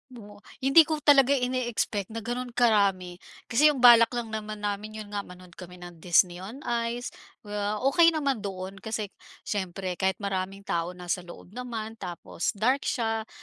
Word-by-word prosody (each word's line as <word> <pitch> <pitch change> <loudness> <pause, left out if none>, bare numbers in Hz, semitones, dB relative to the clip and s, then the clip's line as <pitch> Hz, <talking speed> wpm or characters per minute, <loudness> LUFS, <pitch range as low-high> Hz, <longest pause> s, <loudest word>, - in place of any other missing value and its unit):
Oh, 205 -3 -12 0.2
hindi 295 +4 +7
ko 310 -2 -2
talaga 280 -1 +6
ine-expect 245 -6 -1
na 230 - -4
gano'n 245 +1 -4
karami, 195 -6 +2 0.3
kasi 285 +6 +5
yung 280 -5 +1
balak 235 -2 +9
lang 235 -2 -4
naman 215 -1 -6
namin 205 +1 -3
'yon 215 -1 -8
nga 205 - -2
manood 180 -2 -11
kami 180 +1 -11
ng 175 -1 -11
Disney 175 +1 +3
on 220 +9 -9
Ice 235 +1 -2 0.3
kaya 205 0 -3
okey 330 +5 +5
naman 280 -5 0
doon 195 -1 -6
kasi 215 -2 -4 0.3
siyempre 185 -2 -4
kahit 190 0 +1
maraming 195 0 -3
tao 170 -1 -2
nasa 180 0 -3
loob 175 +1 -12
naman 225 -2 -6
tapos 175 -1 -4
dark 255 +7 +1
siya. 225 -2 -1
215 Hz, 165 wpm, -27 LUFS, 190-245 Hz, 0.3 s, balak